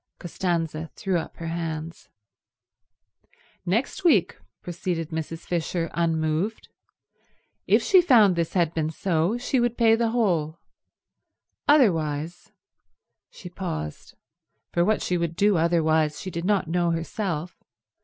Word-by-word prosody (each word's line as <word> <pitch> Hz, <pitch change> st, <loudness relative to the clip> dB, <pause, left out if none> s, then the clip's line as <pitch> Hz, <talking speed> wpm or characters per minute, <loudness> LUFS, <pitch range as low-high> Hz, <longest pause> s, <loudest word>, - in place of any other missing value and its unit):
Costanza 165 Hz, -3 st, -3 dB
threw 190 Hz, -3 st, -1 dB
up -, -, -8 dB
her 165 Hz, -, -7 dB
hands. 165 Hz, -1 st, -5 dB, 1.6 s
Next 235 Hz, -, -1 dB
week, 265 Hz, -, +3 dB, 0.3 s
proceeded 170 Hz, -2 st, -3 dB
Mrs. 160 Hz, +1 st, -5 dB
Fisher 170 Hz, 0 st, -2 dB
unmoved, 165 Hz, +4 st, -1 dB, 1.0 s
if -, -, +4 dB
she 375 Hz, -3 st, +6 dB
found 220 Hz, -, +5 dB
this 170 Hz, -1 st, -2 dB
had 170 Hz, -3 st, +1 dB
been 155 Hz, -1 st, -1 dB
so 170 Hz, +5 st, 0 dB
she 250 Hz, +2 st, 0 dB
would 240 Hz, 0 st, 0 dB
pay 225 Hz, -2 st, +5 dB
the 230 Hz, 0 st, 0 dB
whole. 175 Hz, -9 st, 0 dB, 1.1 s
Otherwise—she 175 Hz, -, -2 dB
paused; 75 Hz, -, -6 dB, 0.6 s
for 170 Hz, -, +3 dB
what 215 Hz, +4 st, +1 dB
she 180 Hz, -1 st, 0 dB
would 170 Hz, -1 st, -2 dB
do 205 Hz, +2 st, +3 dB
otherwise 160 Hz, -2 st, +2 dB
she 185 Hz, -, -6 dB
did 170 Hz, +1 st, -4 dB
not 200 Hz, -3 st, +1 dB
know 175 Hz, +1 st, +1 dB
herself. 170 Hz, 0 st, -3 dB
170 Hz, 120 wpm, -25 LUFS, 160-200 Hz, 1.6 s, she